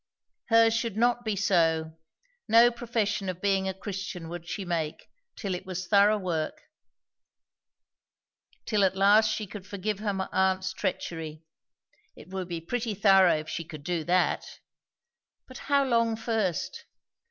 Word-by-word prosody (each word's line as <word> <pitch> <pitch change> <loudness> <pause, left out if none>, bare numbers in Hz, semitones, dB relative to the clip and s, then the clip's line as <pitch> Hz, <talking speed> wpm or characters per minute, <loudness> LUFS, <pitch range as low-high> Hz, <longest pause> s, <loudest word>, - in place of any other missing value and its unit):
Hers 225 -1 +5
should 230 -2 -2
not 240 +1 +2
be 215 -3 -1
so; 165 -5 +1 0.5
no 230 +2 +6
profession 225 -4 -2
of 180 -1 -5
being 195 -1 +1
a - - -3
Christian 190 -4 -6
would 175 0 -7
she 195 +2 -4
make, 165 -3 -3 0.3
till 200 -5 -3
it 180 - -4
was 185 -1 -5
thorough 205 +2 +4
work; 170 -5 -3 2.1
till 210 -3 +1
at 190 -1 +2
last 205 +3 +5
she 215 0 -2
could 200 0 -10
forgive 205 0 -3
her 200 -3 -2
aunt's 190 0 +1
treachery; 165 -5 -4 0.7
it 160 - -14
would 190 -1 -4
be 170 -2 -4
pretty 225 +5 -3
thorough 195 -4 +5
if 155 - -13
she 165 - -4
could 155 -3 -10
do 175 -1 -2
that! 180 +1 +2 1.0
But 255 - -10
how 280 -1 +4
long 230 -3 +2
first? 225 - -2
195 Hz, 145 wpm, -28 LUFS, 180-220 Hz, 2.1 s, no